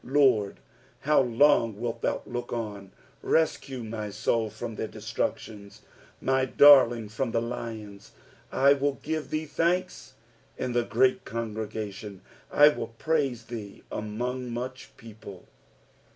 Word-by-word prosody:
17 140 +3 0
Lord, 110 -8 +3 0.4
how 150 +1 +4
long 120 -3 +3
wilt 115 -1 -4
thou - - -1
look 120 0 -5
on? 105 -4 -5 0.3
rescue 135 -5 0
my 110 -1 -5
soul 110 +2 0
from 110 +2 -6
their 110 - -4
destructions, 105 -2 -5 0.4
my 130 0 +1
darling 130 -4 +6
from 115 +5 -3
the 115 - 0
lions. 110 -4 -6 0.4
18 - - -4
I 140 +1 +7
will 140 0 0
give 155 0 -3
thee 155 +1 -2
thanks 170 -4 -1 0.4
in 125 - -2
the 120 0 +2
great 130 +3 +2
congregation: 105 -3 -5 0.3
I 145 +1 +7
will 150 - -4
praise 140 -7 0
thee 110 -4 -8
among 125 +4 -4
much 125 +2 -6
people. 105 -4 -12
115 Hz, 135 wpm, -27 LUFS, 110-135 Hz, 0.4 s, I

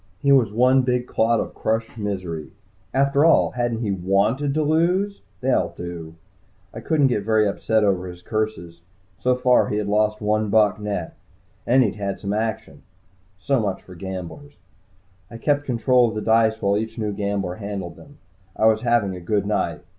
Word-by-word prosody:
He 140 +8 +1
was 130 -7 +4
one 125 +4 +4
big 125 -1 0
clot 115 -1 +1
of - - -4
crushed 110 +1 -2
misery. 95 -7 -4 0.4
After 140 +2 +2
all, 165 - +4
hadn't 120 -2 -2
he 105 -4 -1
wanted 100 +9 +1
to 155 - +1
lose? 180 +6 +1 0.2
They 130 +1 +1
all - - 0
do. 85 -2 -7 0.6
I 115 - -7
couldn't 150 +4 +1
get 120 -6 +1
very 110 0 +2
upset 110 +2 0
over 95 -3 +1
his 90 0 -10
curses. 110 -6 -3 0.4
So 125 0 +2
far 125 0 +3
he 105 - -1
had 105 - -1
lost 105 +1 +1
one 105 0 0
buck, 105 -1 +3
net. 100 -5 -4 0.5
And 130 +2 +5
he'd 105 -2 -2
had 100 -1 -3
some 100 0 -3
action. 110 +1 -3 0.6
So 135 +6 0
much 100 -4 -2
for 90 - -13
gamblers. 95 - -8 0.7
I 115 - -9
kept 145 +4 0
control 125 -1 +3
of 110 - -7
the 110 - -2
dice 110 -1 +3
while 100 +1 +2
each 110 +1 -5
new 105 -2 -2
gambler 100 -3 -2
handled 100 -5 -6
them. 145 0 -16 0.4
I 110 - +1
was 110 0 +4
having 115 -5 +1
a - - -7
good 100 +3 -1
night. 85 -6 -2
110 Hz, 185 wpm, -22 LUFS, 100-125 Hz, 0.7 s, And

